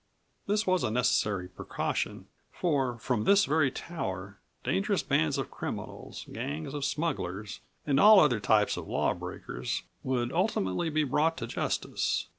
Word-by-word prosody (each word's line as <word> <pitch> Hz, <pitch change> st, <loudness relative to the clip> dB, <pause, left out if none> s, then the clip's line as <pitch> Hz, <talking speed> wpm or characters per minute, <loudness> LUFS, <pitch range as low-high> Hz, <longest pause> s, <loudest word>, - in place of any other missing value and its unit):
This 210 Hz, +2 st, +1 dB
was 185 Hz, -2 st, +2 dB
a -, -, +1 dB
necessary 105 Hz, -5 st, +1 dB
precaution 90 Hz, -, -3 dB, 0.3 s
for, 135 Hz, -8 st, 0 dB
from 115 Hz, -2 st, -1 dB
this 200 Hz, -, +5 dB
very 150 Hz, -1 st, +3 dB
tower, 95 Hz, -, -5 dB, 0.2 s
dangerous -, -, +1 dB
bands 80 Hz, -, +1 dB
of -, -, -3 dB
criminals, -, -, -6 dB
gangs 80 Hz, -, -4 dB
of 145 Hz, -1 st, -3 dB
smugglers, 105 Hz, -, -2 dB, 0.3 s
and 140 Hz, -2 st, +2 dB
all 210 Hz, 0 st, +9 dB
other 130 Hz, -9 st, +4 dB
types 105 Hz, +1 st, +3 dB
of -, -, -6 dB
law -, -, +1 dB
breakers 60 Hz, +1 st, -5 dB, 0.2 s
would 125 Hz, -1 st, -1 dB
ultimately 165 Hz, -, 0 dB
be 155 Hz, 0 st, +1 dB
brought 150 Hz, +4 st, +1 dB
to -, -, -3 dB
justice. 115 Hz, -, -1 dB
130 Hz, 145 wpm, -29 LUFS, 100-160 Hz, 0.3 s, all